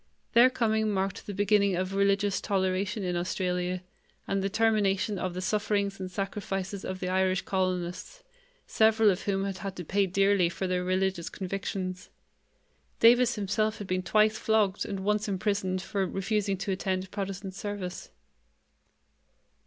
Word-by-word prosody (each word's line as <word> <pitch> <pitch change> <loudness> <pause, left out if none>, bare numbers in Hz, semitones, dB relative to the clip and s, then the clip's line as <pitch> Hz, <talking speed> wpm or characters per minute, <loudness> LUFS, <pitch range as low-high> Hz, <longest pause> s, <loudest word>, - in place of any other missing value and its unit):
Their 240 +2 +7
coming 220 -4 +1
marked 195 -1 -2
the 205 - -4
beginning 200 -1 +3
of 185 +2 -2
religious 200 0 +2
toleration 195 +1 0
in 180 -1 -1
Australia 180 0 -1 0.4
and 195 0 0
the 195 - 0
termination 205 -2 +1
of 185 -1 -3
the 185 - -3
sufferings 200 -1 0
and 185 -1 -4
sacrifices 195 0 -4
of 185 0 -5
the 180 - -2
Irish 185 +1 +1
colonists, 185 - -2 0.4
several 220 -1 +4
of 185 - -3
whom 195 -1 0
had 195 -1 -4
had 195 -1 -5
to 180 - -6
pay 195 +4 +1
dearly 195 -1 +3
for 175 +3 -4
their 180 -1 0
religious 185 -1 0
convictions. 185 -1 -4 0.9
Davis 240 +1 +6
himself 215 +1 0
had 205 - -6
been 185 0 -1
twice 215 +3 +3
flogged 215 -3 +1
and 195 -1 -4
once 210 +2 0
imprisoned 190 -1 -1
for 195 -2 -1
refusing 195 0 -1
to 195 +1 -3
attend 190 0 -2
Protestant 195 -1 -4
service. 195 -2 -5
195 Hz, 150 wpm, -28 LUFS, 185-205 Hz, 0.9 s, Their